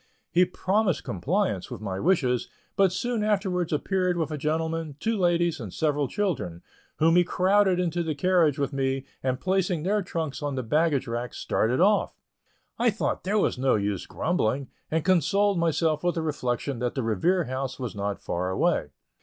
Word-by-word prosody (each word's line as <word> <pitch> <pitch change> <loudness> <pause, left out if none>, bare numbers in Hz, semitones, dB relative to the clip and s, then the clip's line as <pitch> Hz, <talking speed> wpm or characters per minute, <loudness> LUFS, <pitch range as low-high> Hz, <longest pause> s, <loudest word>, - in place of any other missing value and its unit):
He 180 +1 +5
promised 190 -1 0
compliance 180 - -1
with 125 -5 -6
my 95 -3 -4
wishes, 130 - +1 0.3
but 195 -2 +4
soon 240 +2 -1
afterwards 190 -5 0
appeared 180 +3 0
with 160 -2 -1
a - - -2
gentleman, 160 0 -2
two 225 +6 0
ladies, 175 -4 +1
and 110 -7 -6
several 145 - 0
children, 125 - -2 0.3
whom 165 +2 +4
he 180 - +6
crowded 190 +1 +3
into 175 -1 0
the 160 -3 -2
carriage 165 -2 +3
with 140 0 -1
me, 135 0 -1 0.2
and 130 0 -1
placing 185 -3 0
their 205 +3 +1
trunks 160 -6 -4
on 145 -2 -2
the 130 - -2
baggage 150 +3 +1
rack, 120 +1 -4
started 120 +4 0
off. 200 +3 +2 0.6
I 240 +1 +4
thought 220 0 -2
there 200 +3 0
was 195 - +1
no 130 0 +3
use 100 -2 -2
in - - -16
grumbling, 140 -5 0 0.2
and 160 0 -1
consoled 195 +1 +3
myself 160 -1 +1
with 175 0 +1
the 165 - -1
reflection 135 -3 -2
that 120 0 -2
the 130 - -1
Revere 170 - +1
House 130 -1 -4
was 125 -3 -4
not 100 0 -3
far 90 +1 -2
away. 95 - +1
160 Hz, 180 wpm, -26 LUFS, 130-185 Hz, 0.6 s, he